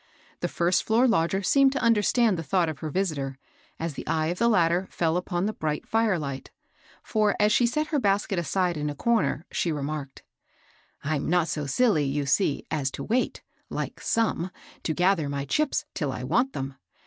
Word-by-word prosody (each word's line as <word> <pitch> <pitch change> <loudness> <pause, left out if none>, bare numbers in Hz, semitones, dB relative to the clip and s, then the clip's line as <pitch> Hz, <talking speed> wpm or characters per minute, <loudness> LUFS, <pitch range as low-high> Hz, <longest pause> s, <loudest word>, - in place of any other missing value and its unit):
The - - -1
first 175 +1 +1
floor 230 +4 +3
lodger 195 -3 +1
seemed 275 +6 +4
to 275 - -1
understand 230 -1 +3
the 165 - -3
thought 175 0 +1
of 150 -3 -6
her 155 - -4
visitor, 145 -7 -2 0.4
as 165 -1 -3
the - - -8
eye 155 0 +1
of 175 - -3
the 235 - +3
latter 180 -3 +3
fell 165 -1 0
upon 180 0 -1
the 215 - -1
bright 155 -4 -3
fire 225 -4 +2
light; 140 -4 -5 0.5
for, 215 -2 +1
as 210 +1 +4
she 235 +2 +4
set 305 +6 -1
her 295 - +1
bas 200 -3 +2
ket 195 -5 -2
aside 175 0 0
in 150 0 -2
a 145 - -5
comer, 165 -6 +1
she 170 - 0
remarked, 145 -2 -4 0.3
— - - -28
*^ - - -3
I'm 150 -1 -1
not 175 -1 +2
so 150 -2 -2
siUy, 150 - +2
yon 145 0 -1
see, 140 +2 +1
as 145 -4 0
to - - -5
wait, 245 +3 -1 0.3
like - - -4
some, 220 -6 0 0.3
to 160 - -1
gather 180 -5 +2
my 140 0 -3
chips 305 - 0
till 145 -4 -2
I 125 - -5
want 215 - +1
them. 135 0 -5
175 Hz, 205 wpm, -26 LUFS, 150-215 Hz, 0.5 s, seemed